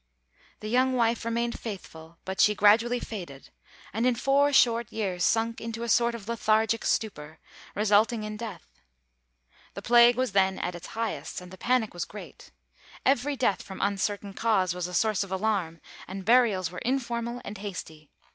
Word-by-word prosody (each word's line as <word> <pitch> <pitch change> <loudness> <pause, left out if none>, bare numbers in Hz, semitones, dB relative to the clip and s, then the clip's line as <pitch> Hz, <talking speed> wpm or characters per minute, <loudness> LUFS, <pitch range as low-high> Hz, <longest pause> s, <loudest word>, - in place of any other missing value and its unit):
The 215 - -5
young 255 +3 +2
wife 235 -2 +1
remained 235 +1 -1
faithful; 170 -6 -9
but 190 0 -1
she 210 - +5
gradually 225 +4 +4
faded; 175 - -8 0.4
and 225 +3 -1
in 250 - +2
four 275 +4 +2
short 235 -4 +3
years 190 -5 -2
sunk 225 +3 +1
into 230 0 -5
a 235 - -4
sort 235 0 +3
of 215 -3 -10
lethargic 225 -1 +1
stupor, 155 -8 -2 0.4
resulting 215 +2 +2
in 215 0 -5
death. 195 - -9 0.9
The - - -7
plague 240 0 +6
was 255 -2 -1
then 190 -1 +2
at 180 - -3
its 175 +1 -9
highest, 225 -1 -3
and 180 0 -12
the - - -9
panic 245 -3 +1
was 175 - -3
great. 210 - -11 0.6
Every 280 +2 +2
death 240 -7 0
from 190 - -9
uncertain 200 0 -1
cause 195 -5 +1
was 180 -1 -3
a 180 - -6
source 215 +1 +2
of 195 - -10
alarm, 190 -4 -1 0.3
and 190 0 -7
burials 215 -7 +3
were 180 - -6
informal 240 -2 -2
and 205 -1 -7
hasty. 160 -7 -8
215 Hz, 170 wpm, -27 LUFS, 190-235 Hz, 0.9 s, plague